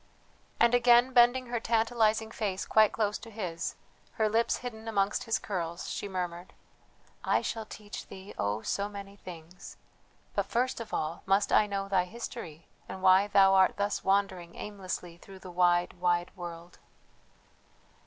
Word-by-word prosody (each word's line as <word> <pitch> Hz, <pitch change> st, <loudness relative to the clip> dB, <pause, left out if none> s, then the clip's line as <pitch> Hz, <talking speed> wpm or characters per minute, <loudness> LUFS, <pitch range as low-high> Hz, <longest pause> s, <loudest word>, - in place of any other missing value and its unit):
And 235 Hz, +1 st, +5 dB
again 245 Hz, +1 st, +5 dB
bending 245 Hz, +1 st, +5 dB
her 240 Hz, -1 st, -2 dB
tantalizing 225 Hz, -1 st, +1 dB
face 200 Hz, -4 st, -3 dB
quite 215 Hz, -1 st, +4 dB
close 210 Hz, -2 st, -1 dB
to 230 Hz, -, -11 dB
his, 185 Hz, -6 st, -4 dB, 0.4 s
her 220 Hz, -2 st, +1 dB
lips 230 Hz, +2 st, +1 dB
hidden 225 Hz, -3 st, -8 dB
amongst 200 Hz, -2 st, 0 dB
his 225 Hz, -, +1 dB
curls, 170 Hz, -3 st, -4 dB
she -, -, -4 dB
murmured: 180 Hz, -2 st, -5 dB, 0.7 s
"I -, -, +2 dB
shall 225 Hz, -2 st, -4 dB
teach 210 Hz, 0 st, -9 dB
thee, 190 Hz, +1 st, -10 dB
oh 105 Hz, +2 st, -2 dB
so 200 Hz, +1 st, -1 dB
many 200 Hz, -1 st, -9 dB
things; 175 Hz, -2 st, -11 dB, 0.6 s
but -, -, -1 dB
first 250 Hz, +2 st, 0 dB
of 230 Hz, -, -7 dB
all 155 Hz, +2 st, -2 dB
must 195 Hz, +1 st, +2 dB
I 210 Hz, -, +5 dB
know 195 Hz, -1 st, -3 dB
thy 190 Hz, -2 st, +2 dB
history 180 Hz, -6 st, -8 dB, 0.2 s
and 190 Hz, -, -7 dB
why 190 Hz, +2 st, +6 dB
thou 195 Hz, -1 st, +5 dB
art 190 Hz, -1 st, +4 dB
thus 205 Hz, 0 st, -1 dB
wandering 190 Hz, -3 st, 0 dB
aimlessly 185 Hz, -4 st, -6 dB
through 195 Hz, +2 st, -13 dB
the 185 Hz, -1 st, -10 dB
wide, 175 Hz, 0 st, +2 dB
wide 175 Hz, 0 st, 0 dB
world." 175 Hz, -1 st, -9 dB
200 Hz, 155 wpm, -30 LUFS, 180-220 Hz, 0.7 s, why